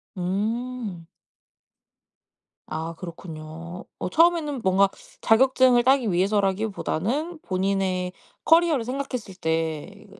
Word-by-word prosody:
음. 205 Hz, 0 st, -3 dB, 1.6 s
아 160 Hz, +1 st, -4 dB
그렇군요. 165 Hz, 0 st, -8 dB
어 -, -, -3 dB
처음에는 325 Hz, -, +3 dB
뭔가 195 Hz, 0 st, +4 dB, 0.3 s
자격증을 255 Hz, +1 st, +5 dB
따기 260 Hz, -4 st, +3 dB
위해서라기보다는 205 Hz, -, 0 dB
본인의 185 Hz, -1 st, -1 dB, 0.3 s
커리어를 325 Hz, -6 st, +4 dB
생각했을 250 Hz, -5 st, -4 dB
때 160 Hz, +4 st, -3 dB
200 Hz, 230 characters per minute, -25 LUFS, 180-255 Hz, 1.6 s, 자격증을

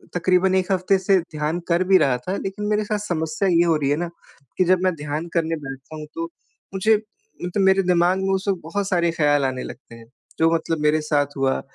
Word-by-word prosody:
तकरीबन 185 Hz, +2 st, +2 dB
1 190 Hz, 0 st, 0 dB
हफ़्ते 190 Hz, +1 st, +2 dB
से 190 Hz, 0 st, +3 dB
ध्यान 155 Hz, 0 st, -3 dB
कर 170 Hz, +1 st, +2 dB
भी 190 Hz, +1 st, +5 dB
रहा 130 Hz, -7 st, +2 dB
था 185 Hz, -, -1 dB
लेकिन 195 Hz, +2 st, -5 dB
मेरे 210 Hz, 0 st, +1 dB
साथ 210 Hz, 0 st, -1 dB
समस्या 185 Hz, +1 st, -2 dB
ये 170 Hz, -1 st, +4 dB
हो 165 Hz, -2 st, +3 dB
रही 145 Hz, -3 st, 0 dB
है 145 Hz, -, +3 dB
न, 175 Hz, +1 st, -3 dB, 0.5 s
कि -, -, +4 dB
जब 185 Hz, +1 st, +3 dB
मैं 185 Hz, -1 st, +2 dB
ध्यान 150 Hz, +2 st, -4 dB
करने 165 Hz, -1 st, 0 dB
बैठता 135 Hz, -1 st, -9 dB
हूँ 155 Hz, -1 st, -7 dB
तो 165 Hz, -, -2 dB, 0.5 s
मुझे 215 Hz, +3 st, +3 dB, 0.5 s
मतलब 185 Hz, +3 st, 0 dB
मेरे 190 Hz, 0 st, +4 dB
दिमाग 180 Hz, +1 st, +2 dB
में 195 Hz, 0 st, 0 dB
उस 190 Hz, +1 st, -2 dB
वक़्त 190 Hz, -3 st, 0 dB
बहुत 195 Hz, +5 st, -3 dB
सारे 170 Hz, -2 st, +2 dB
ख्याल 145 Hz, -3 st, +2 dB
आने 130 Hz, -1 st, -2 dB
लगते 115 Hz, -, -10 dB
हैं। 115 Hz, 0 st, -14 dB, 0.3 s
जो 165 Hz, +1 st, +4 dB
मतलब 165 Hz, -1 st, -1 dB
मेरे 150 Hz, +1 st, +2 dB
साथ 145 Hz, -1 st, -1 dB
हुआ 135 Hz, -1 st, +1 dB
170 Hz, 225 wpm, -22 LUFS, 150-190 Hz, 0.5 s, भी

